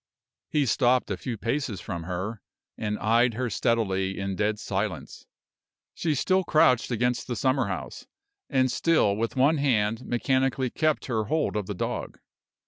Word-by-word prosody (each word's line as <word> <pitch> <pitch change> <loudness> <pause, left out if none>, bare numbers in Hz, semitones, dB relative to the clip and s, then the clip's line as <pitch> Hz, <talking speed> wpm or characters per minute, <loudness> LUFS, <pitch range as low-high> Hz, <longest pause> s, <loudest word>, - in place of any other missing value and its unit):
He 150 -2 +2
stopped 125 -2 +2
a - - 0
few 115 +5 -5
paces 115 0 -2
from 85 -5 -5
her, 95 +5 -4 0.3
and 105 -1 -2
eyed 115 +2 +2
her 125 -1 -2
steadily 95 -4 0
in 95 0 -2
dead 105 +2 0
silence. 95 -7 -4 0.7
She 160 -3 -1
still 185 +7 +2
crouched 140 -7 +3
against 125 0 0
the 120 - -2
summer 130 +2 +1
house, - - -6 0.4
and 130 -2 +2
still 130 -8 +2
with 115 +4 -2
one 140 +5 +4
hand 115 -4 +1
mechanically 130 +1 0
kept 155 -1 0
her 110 -4 -1
hold 155 +3 0
of 105 -3 -2
the 105 - -4
dog. - - -4
115 Hz, 155 wpm, -26 LUFS, 105-130 Hz, 0.7 s, one